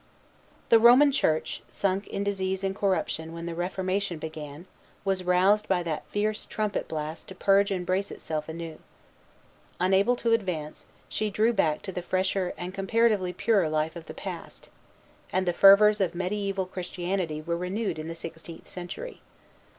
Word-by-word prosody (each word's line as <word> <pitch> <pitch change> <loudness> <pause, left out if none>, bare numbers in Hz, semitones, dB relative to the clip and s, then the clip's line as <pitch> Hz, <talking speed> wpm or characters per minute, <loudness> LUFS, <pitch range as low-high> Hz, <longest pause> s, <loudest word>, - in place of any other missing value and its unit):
The 230 - +7
Roman 250 +5 +7
Church, 160 - 0
sunk 195 +6 -1
in 200 - -3
disease 190 -1 -1
and 195 0 -1
corruption 185 -5 -1
when 170 0 -6
the 170 - -4
Reformation 185 +1 -2
began, 155 0 -7 0.4
was 190 -1 0
roused 185 +4 +3
by 180 -2 +1
that 160 -3 -4
fierce 210 +1 -1
trumpet 215 -1 -2
blast 155 +1 -5
to 190 - -9
purge 200 +1 +3
and 185 -3 -2
brace 185 +2 0
herself 155 0 -5
anew. 165 -1 -6 1.0
Unable 195 +6 +3
to 235 -1 +1
advance, 180 -9 -2 0.2
she 215 - -1
drew 215 +3 +2
back 155 -7 +1
to 195 - -5
the 180 - -4
fresher 185 +1 0
and 180 +1 -5
comparatively 200 -1 +2
purer 190 -2 +2
life 155 +1 -1
of 165 -2 -9
the - - -8
past; - - -8 0.6
and 185 0 0
the 175 - +2
fervors 205 +3 +7
of 180 -3 +1
mediæval 190 +1 -2
Christianity 180 -3 -3
were 170 +2 -2
renewed 185 +2 -2
in 155 - -5
the 165 - -5
sixteenth 165 0 -9
century. 455 - -7
185 Hz, 160 wpm, -27 LUFS, 170-200 Hz, 1.0 s, The